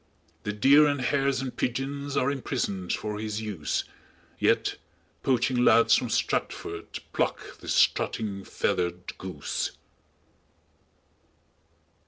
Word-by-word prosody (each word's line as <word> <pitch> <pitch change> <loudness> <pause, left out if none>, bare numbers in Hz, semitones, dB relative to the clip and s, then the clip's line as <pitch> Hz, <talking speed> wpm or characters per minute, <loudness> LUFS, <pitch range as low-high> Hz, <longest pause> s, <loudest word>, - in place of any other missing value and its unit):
The 105 - 0
deer 140 +8 +6
and 145 -1 0
hares 135 +1 +1
and 130 -2 -5
pidgeons 140 +3 -2
Are 140 0 +2
imprisoned 120 -9 -2
for 105 -1 -2
his 110 -1 -3
use, 105 -9 -2 0.6
Yet, - - +2 0.4
poaching 125 -1 +2
lads 115 -1 +6
from - - 0
Stratford 85 0 -1 0.3
Pluck - - -2
this - - -2
strutting, 100 -3 +1
feathered 90 -1 -2
goose." 90 -6 -3
115 Hz, 105 wpm, -27 LUFS, 100-135 Hz, 0.6 s, deer